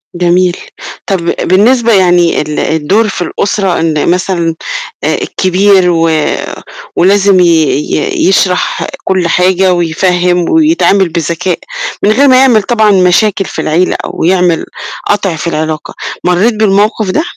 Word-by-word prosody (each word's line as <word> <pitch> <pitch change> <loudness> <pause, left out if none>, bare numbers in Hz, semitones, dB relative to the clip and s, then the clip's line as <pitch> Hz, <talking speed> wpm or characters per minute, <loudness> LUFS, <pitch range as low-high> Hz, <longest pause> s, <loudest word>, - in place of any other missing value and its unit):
جميل، 180 0 +1 0.5
طَب 190 -4 -2 0.2
بالنسبة 230 +5 +2
يعني 175 -3 +2
ال 150 0 -4
الدور 160 +8 0
في 185 - -5
الأسرة 195 -1 -1
إن 160 -2 0
مثلًا 175 -2 -1 0.5
آآ، - - 0
الكبير 190 0 +1
و 165 -1 +1 0.9
ولازم 195 +1 +3
ي 180 - +4 0.5
ي 390 -6 -1
يشرح 185 -1 0 0.2
كل 185 -2 0
حاجة 185 +2 +2
ويفهّم 175 +1 0
ويتعامل 305 - +2
بذكاء 170 +2 -2 0.4
من 205 - +3
غير 275 +6 +3
ما 255 -1 +5
يعمل 250 -5 +4
طبعًا 220 -1 +2
مشاكل 195 +2 +2
في - - -5
العيلة 175 +4 0
أو - - -5
يعمل 180 -1 +1 0.4
قَطْع 195 -4 0
في 160 - -5
العلاقة، 155 -1 -3 0.3
مرّيت 180 +7 +1
بالموقف 210 0 +1
ده؟ 315 - 0
185 Hz, 130 wpm, -10 LUFS, 175-205 Hz, 0.9 s, ما